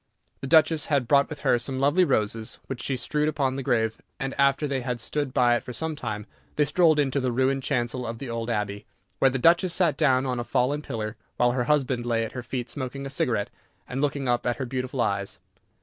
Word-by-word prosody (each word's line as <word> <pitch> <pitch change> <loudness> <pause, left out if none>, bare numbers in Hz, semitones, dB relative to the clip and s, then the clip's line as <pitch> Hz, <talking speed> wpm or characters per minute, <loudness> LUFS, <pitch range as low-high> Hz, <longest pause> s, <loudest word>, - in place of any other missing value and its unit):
The 135 - -5
Duchess 160 0 +4
had 140 -5 +1
brought 140 +1 +4
with 150 -3 -7
her 120 - +3
some 130 +2 -2
lovely 145 +7 +4
roses, 110 -7 0
which 130 -3 -5
she 135 +1 -1
strewed 150 +4 0
upon 135 -4 0
the 135 - -3
grave, 110 -3 0 0.2
and 135 0 -3
after 140 +2 +3
they 135 -2 -1
had 125 -1 -3
stood 145 +3 -2
by 120 -1 +4
it - - -2
for 125 - -7
some 160 +5 -3
time 110 -6 -5 0.3
they 150 - +3
strolled 155 +1 +4
into 140 -1 +1
the 130 -2 0
ruined 130 +2 +1
chancel 125 -2 -1
of 115 0 -4
the 135 - -6
old 115 0 -3
abbey. 105 -2 -2 0.3
There 135 - +5
the 135 - -2
Duchess 170 +5 +4
sat 170 -5 +2
down 130 -4 +3
on 125 -2 -1
a - - -1
fallen 130 +5 0
pillar, 110 -6 -5 0.2
while 120 0 +3
her 125 -1 -1
husband 130 -4 +1
lay 115 -1 0
at - - -7
her 125 - -5
feet 120 0 -4
smoking 140 0 -5
a 135 - -5
cigarette 115 -6 0 0.4
and 130 +2 -3
looking 140 -2 -1
up 120 0 +1
at 120 - +1
her 130 - -3
beautiful 130 0 -3
eyes. 100 -3 -1
130 Hz, 230 wpm, -26 LUFS, 120-140 Hz, 0.4 s, There